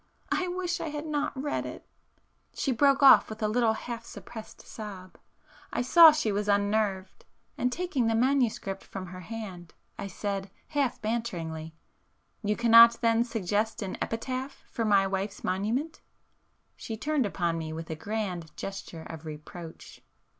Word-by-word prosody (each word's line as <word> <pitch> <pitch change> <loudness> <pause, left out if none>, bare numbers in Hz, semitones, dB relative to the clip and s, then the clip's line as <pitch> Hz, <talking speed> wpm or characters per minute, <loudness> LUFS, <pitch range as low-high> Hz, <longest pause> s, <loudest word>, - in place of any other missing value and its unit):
I 365 - +1
wish 355 -1 -2
I 320 - -3
had 295 +1 -5
not 290 -3 -2
read 290 +2 -1
it...." - - -8 0.7
She 275 - 0
broke 275 +3 +3
off 275 - +8
with 220 0 -6
a - - +3
little 225 0 +2
half 230 +1 -6
suppressed 225 -1 -10
sob,—I 200 +2 -8
saw 325 +5 +9
she 300 -8 0
was 205 +1 -1
unnerved, 200 -2 0 0.3
and 250 - 0
taking 310 -7 0
the 225 - +2
manuscript 235 -6 +1
from 190 -1 -7
her 185 0 -9
hand, 185 -4 -8 0.2
I - - -3
said 195 0 -4 0.2
half 285 -5 0
banteringly— 165 -9 -3 0.7
"You 210 -1 0
cannot 230 0 +7
then 230 0 +3
suggest 220 -1 -1
an 190 - -4
epitaph 255 +4 -4
for 230 - -1
my 200 -2 +4
wife's 195 +1 -3
monument?" 230 - -1 0.7
She 225 - -6
turned 290 -1 0
upon 170 -4 -1
me 160 -1 -5
with 160 +1 -6
a - - -2
grand 180 -4 -4
gesture 195 -4 -6
of 160 -1 -9
reproach. 160 +2 -10
220 Hz, 150 wpm, -28 LUFS, 190-250 Hz, 0.7 s, saw